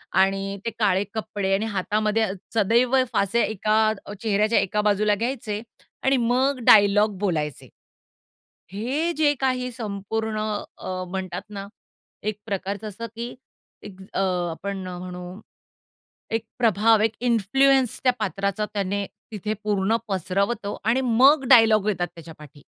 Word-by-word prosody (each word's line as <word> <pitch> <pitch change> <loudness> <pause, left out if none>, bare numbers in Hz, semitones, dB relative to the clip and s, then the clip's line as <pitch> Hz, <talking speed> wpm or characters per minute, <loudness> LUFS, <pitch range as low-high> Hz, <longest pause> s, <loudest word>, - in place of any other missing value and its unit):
आणि 195 +1 +1
ते 230 - +1
काळे 200 -2 +3
कपडे 205 -3 -2
आणि 210 - -1
हातामध्ये 215 +1 0 0.3
सदैव 235 +5 +3 0.2
फासे 205 +4 +2
एका 215 0 0 0.3
अ, 205 - -7
चेहऱ्याच्या 215 +1 +2
एका 210 +2 0
बाजूला 210 0 +2
घ्यायचे 225 -2 -3 0.4
आणि 270 0 +3
मग 255 +3 +1
डायलॉग 205 -1 +5
बोलायचे. 155 -8 -2 1.0
हे 270 +11 -1
जे 295 -2 +4
काही 255 -1 0
संपूर्ण 220 -1 -3 0.4
अ, 185 0 -4
म्हणतात 190 0 -4
ना, 200 -1 -7 0.6
एक 210 0 -2
प्रकारचं 200 0 -4
असं 230 +4 -7
की 235 +1 -5 0.5
एक 195 -2 -11
अ, - - 0 0.3
आपण 190 +2 -5
म्हणू, 180 +1 -7 0.9
एक 225 0 -1
प्रभाव 225 -1 +4
एक 220 - +2
इन्फ्लुअन्स 250 +3 +2
त्या 255 - +4
पात्राचा 200 0 -1
त्याने 200 0 -1 0.3
तिथे 210 +1 -3
पूर्ण 205 +1 +1
पसरवतो 200 +3 -1
आणि 235 +4 +2
मग 265 +4 +4
डायलॉग 220 -4 +6
येतात 175 -4 0
त्याच्यापाठी. 155 -4 -13
210 Hz, 125 wpm, -24 LUFS, 195-230 Hz, 1.0 s, डायलॉग